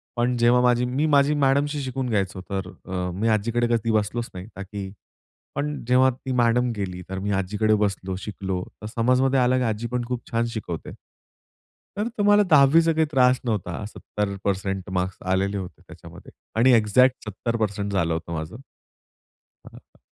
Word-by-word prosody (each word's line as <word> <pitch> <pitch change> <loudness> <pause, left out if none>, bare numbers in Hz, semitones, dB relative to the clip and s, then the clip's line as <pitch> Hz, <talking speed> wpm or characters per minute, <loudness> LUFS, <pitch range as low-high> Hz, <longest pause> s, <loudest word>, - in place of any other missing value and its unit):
पण, 120 +1 +1
जेव्हा 120 +1 +4
माझी 125 0 +3
मी 130 +5 0
माझ्या 145 -1 +3
मॅडमशी 145 +2 +1
शिकून 130 -1 -3
घ्यायचो. 95 -3 -1
तर, 95 -1 -3 0.2
अ, 90 -1 -3
मी 110 - +1
आजीकडे 115 +3 +1
कधी 115 0 -1
बसलोच 110 +2 -1
नाही 90 +3 -8
ताकी. 100 0 -6 0.6
पण, 145 +1 -3
जेव्हा 130 +1 +5
ती 130 +1 -7
मॅडम 120 0 +2
गेली. 90 -3 -4
तर, 95 - -4
मी 100 +2 -2
आजीकडे 105 +3 +1
बसलो, 95 -1 -3
शिकलो. 95 -3 -4 0.2
तर, 105 - -8
समजण्यामध्ये 125 +3 +3
आला, 125 0 +3
की 130 - +1
आजी 115 0 -2
पण 125 -1 -1
खूप 125 -1 -5
छान 115 0 +1
शिकवते. 85 -7 -5 1.1
तर, 210 - 0
तुम्हाला 205 0 +5
10वी 145 +2 +7
चा 165 0 +2
काही 160 0 +2
त्रास 125 -2 +4
नव्हता, 105 -3 -2
70% 100 -2 -3
मार्क्स 90 0 -2
आलेले 100 +2 +1
होते. 95 -3 -8
त्याच्यामध्ये - - -13 0.3
आणि 130 +2 +6
एक्झॅक्ट 125 +4 +4
70% 105 -1 -2
झालं 85 -4 +1
होतं 80 +1 -4
माझं. 80 +5 -5 1.1
हां, - - -12
हां. - - -31
115 Hz, 165 wpm, -24 LUFS, 95-125 Hz, 1.1 s, 10वी